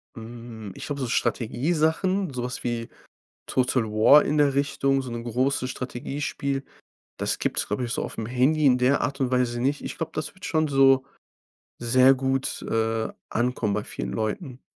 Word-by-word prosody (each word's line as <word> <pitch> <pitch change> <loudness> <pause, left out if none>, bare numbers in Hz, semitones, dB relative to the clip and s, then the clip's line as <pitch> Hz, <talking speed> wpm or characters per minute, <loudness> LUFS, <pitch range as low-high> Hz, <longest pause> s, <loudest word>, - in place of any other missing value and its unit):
Hm, 115 -2 -9
ich - - -7
glaube, 145 -2 -4
so 130 - -1
Strategiesachen, 160 - 0
so 125 -1 -3
was 125 +1 -5
wie 120 -1 -3 0.6
Total 125 -1 +1
War 110 +7 +6
in 150 - 0
der 145 -2 +4
Richtung, 140 -1 +1
so 130 - -7
'ne 120 0 -4
große 130 +2 0
Strategiespiel. 135 +2 -3 0.5
Das - - -1
gibt's, - - -1
glaube 105 +5 -2
ich, 120 - -3
so - - -1
aufm 110 - -5
Handy 130 +6 +2
in 130 -2 +5
der 125 +3 +3
Art 135 +4 -2
und 130 -2 0
Weise 125 -1 +1
nicht. 140 +4 0
Ich - - -6
glaube, 165 - -4
das 155 - -4
würd 190 - -11
schon 155 -2 +1
so 135 -1 +5 0.8
sehr 130 +3 +5
gut, 135 0 -1
äh, 115 0 0 0.2
ankommen 120 -3 0
bei 105 - -2
vielen - - -5
Leuten. 125 - -3
130 Hz, 175 wpm, -25 LUFS, 120-140 Hz, 0.8 s, War